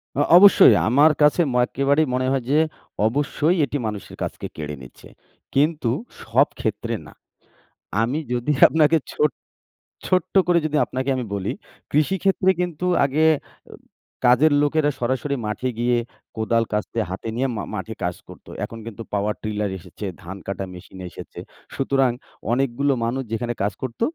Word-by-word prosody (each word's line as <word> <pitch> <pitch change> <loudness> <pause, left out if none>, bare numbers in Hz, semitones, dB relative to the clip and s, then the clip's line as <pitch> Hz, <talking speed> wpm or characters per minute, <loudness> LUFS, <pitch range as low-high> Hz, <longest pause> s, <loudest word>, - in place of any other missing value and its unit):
আ 145 - +2 0.2
অবশ্যই 200 +1 +8
আমার 145 +7 +5
কাছে 150 +4 +5
ম - - -2
একেবারেই 140 +4 +1
মনে 130 0 0
হয় 135 -3 0
যে, 145 - +3 0.5
অবশ্যই 145 +6 +1
এটি 145 +2 -3
মানুষের 105 -3 -6
কাজকে - - -5
কেড়ে 75 -1 -5
নিচ্ছে। 65 -1 -14 0.5
কিন্তু 150 -2 +2 0.3
সব - - +3
ক্ষেত্রে - - -2
না। - - -14 0.9
আমি 125 +7 0
যদি 120 +4 0 0.2
আপনাকে 160 0 +3
ছো - - -1 0.8
ছোট্ট 185 0 0
করে 175 -1 +4
যদি 155 - -2
আপনাকে 130 +1 -3
আমি 125 - -2
বলি 100 -1 -2 0.4
কৃষি 155 +6 +2
ক্ষেত্রে 190 -1 +3
কিন্তু 180 -1 -2 0.2
আগে 140 +3 +1
এ - - -3 0.9
কাজের 135 +5 +5
লোকেরা 145 0 +2
সরাসরি 130 +3 -1
মাঠে 105 +5 -2
গিয়ে 120 0 +2 0.4
কোদাল, 115 +1 +1
কাস্তে 105 +2 -2
হাতে 95 +4 -5
নিয়ে 130 +2 +1
মা 105 - -3
মাঠে 105 +2 -5
কাজ 90 -1 -2
করত। - - -14 0.2
এখন 115 - -8
কিন্তু 115 0 -7
পাওয়ার 105 +1 0
ট্রিলার 105 -2 -2
এসেছে, 90 +3 -10 0.2
ধান 95 +2 -7
কাটা 100 0 -3
মেশিন 90 +1 -12
এসেছে। - - -10 0.3
সুতরাং 135 -1 +2 0.4
অনেকগুলো 135 +2 +1
মানুষ 125 +3 -1
যেখানে 120 +1 -2
কাজ 105 - 0
করত 130 -3 -5
130 Hz, 155 wpm, -22 LUFS, 110-150 Hz, 0.9 s, অবশ্যই